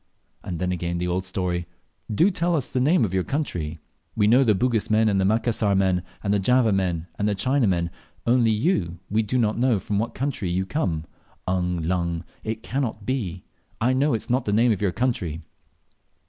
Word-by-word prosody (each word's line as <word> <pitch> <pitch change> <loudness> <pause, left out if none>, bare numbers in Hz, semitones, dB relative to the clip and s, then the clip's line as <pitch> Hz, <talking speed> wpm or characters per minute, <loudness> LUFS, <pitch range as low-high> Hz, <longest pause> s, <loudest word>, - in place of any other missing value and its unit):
And 90 - -4
then 90 +2 -1
again 85 -1 -2
the 90 +1 -1
old 90 +1 -1
story, 90 -2 -2 0.4
"Do 170 - +4
tell 175 -1 0
us 140 -2 -2
the 130 - +1
name 140 0 +4
of 95 - -4
your 95 -1 +1
country. 85 - -3 0.4
We 105 - +3
know 120 +6 +6
the 110 -5 +3
Bugis 115 +1 0
men, 110 +1 +4
and 100 -2 +2
the - - +2
Macassar 110 -1 +2
men, 95 -2 +2 0.2
and 100 -1 +1
the 105 - +2
Java 125 +2 +3
men, 90 -4 0
and 105 - +1
the 105 - +1
China 130 +4 +2
men; 85 -2 0 0.3
only 120 -1 +4
you, 105 - +1
we 110 +2 +3
don't 110 0 0
know 125 -3 +3
from 100 +1 -2
what 115 - -3
country 130 -8 -2
you 95 +2 0
come. 85 - -1 0.4
Ung 90 -2 -1
lung! 85 -1 -1 0.2
it 110 +1 -4
can't 120 -6 -3
be; 95 -9 -2 0.4
I 120 +3 +2
know 140 +2 +2
that - - +2
is - - -11
not 130 +2 +1
the 105 - 0
name 115 +3 +4
of 105 - -1
your 100 -3 +2
country." 90 -9 -2
105 Hz, 205 wpm, -24 LUFS, 90-125 Hz, 0.4 s, know